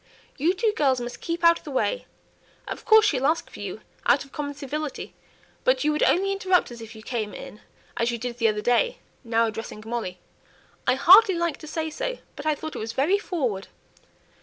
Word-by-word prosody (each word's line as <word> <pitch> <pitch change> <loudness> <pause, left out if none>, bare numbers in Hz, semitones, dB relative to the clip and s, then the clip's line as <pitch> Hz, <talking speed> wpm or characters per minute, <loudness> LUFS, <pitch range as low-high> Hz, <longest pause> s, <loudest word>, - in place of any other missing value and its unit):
You 335 +7 +1
two 435 +2 +1
girls 265 -4 +2
must 240 0 -6
keep 340 0 -3
out 335 0 +6
of - - -24
the - - -8
way. 390 - -1 0.6
Of - - -6
course 440 -2 +7
she'll 275 -9 +2
ask 325 +2 0
for - - -11
you, - - -6 0.3
out - - +4
of 275 - -20
common 285 -1 -4
civility; 290 +1 -5 0.5
but - - +3
you 305 - +3
would 300 - -1
only 390 +2 +3
interrupt 375 -6 +2
us 235 -1 -9
if 225 0 -10
you 220 - -11
came 220 -3 -3
in, 210 - -10 0.4
as 235 - +1
you 235 - -2
did 240 +1 -5
the 230 - +4
other 210 -1 0
day;" 245 - +2 0.3
now 230 -1 +2
addressing 220 -1 -6
Molly 225 -6 -4 0.7
"I - - +4
hardly 375 +8 +7
like 340 -1 -1
to 310 - -11
say 315 0 -3
so, - - -3 0.2
but 290 - -6
I 305 - +3
thought 315 +2 -7
it - - -4
was 225 +1 -4
very 320 +11 +2
forward." 250 - -2
290 Hz, 210 wpm, -25 LUFS, 235-345 Hz, 0.7 s, course